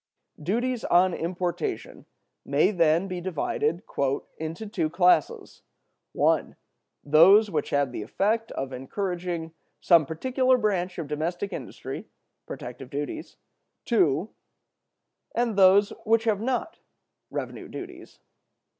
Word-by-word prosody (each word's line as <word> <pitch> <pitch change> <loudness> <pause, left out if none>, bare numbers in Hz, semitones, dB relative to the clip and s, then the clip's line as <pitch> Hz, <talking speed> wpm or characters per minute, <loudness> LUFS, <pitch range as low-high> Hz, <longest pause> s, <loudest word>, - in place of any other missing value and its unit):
Duties 240 +8 -1
on 180 +1 +4
importation 180 - -4 0.4
may, - - +2
then, 170 0 +2
be 180 -2 -5
divided 165 -1 -1 0.6
"into 160 +6 -5
two 190 -7 -1
classes: 180 -2 +2 0.5
(1) - - +1 0.5
those 190 +8 +6
which 150 -4 -1
have 140 -2 +1
the 125 - -5
effect 215 - -1
of 135 0 -4
encouraging 170 +4 -4 0.3
some 165 -5 +5
particular 255 - +1
branch 190 -5 -1
of 165 -4 -4
domestic 175 +6 -3
industry 135 -8 -7 0.4
[protective 125 +1 -8
duties], 145 +1 -5 0.5
(2) 180 - +2 1.1
and 235 -2 0
those 195 +1 +6
which 225 0 +3
have 215 -3 +1
not 255 +6 -2 0.5
[revenue - - -5
duties]. - - -10
180 Hz, 110 wpm, -26 LUFS, 155-210 Hz, 1.1 s, those